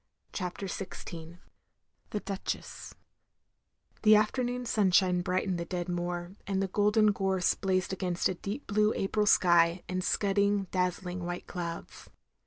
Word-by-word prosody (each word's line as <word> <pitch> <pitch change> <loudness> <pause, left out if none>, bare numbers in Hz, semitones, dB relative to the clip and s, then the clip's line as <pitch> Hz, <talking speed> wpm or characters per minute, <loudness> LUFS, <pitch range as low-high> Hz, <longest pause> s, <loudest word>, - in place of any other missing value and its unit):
CHAPTER 180 +1 -4
XVI 170 -3 -7 0.7
THE 210 - -3
DUCHESS 195 -1 -5 1.1
The 215 0 +7
afternoon 245 +3 +1
stanshine 185 -5 +3
brightened 185 0 -1
the 170 - -3
dead 175 -1 -3
moor, 175 0 -3 0.2
and 195 -1 0
the 195 - 0
golden 210 +2 +3
gorse 190 -2 +1
blazed 190 -1 -1
against 180 -2 0
a - - -1
deep 205 +9 -6
blue 210 +1 +2
April 210 +2 0
sky 175 -2 +4
and 185 0 -2
scudding, 200 +1 +2
dazzling, 180 0 -1
white 175 0 -4
clouds. 170 -2 -6
190 Hz, 130 wpm, -30 LUFS, 175-205 Hz, 1.1 s, The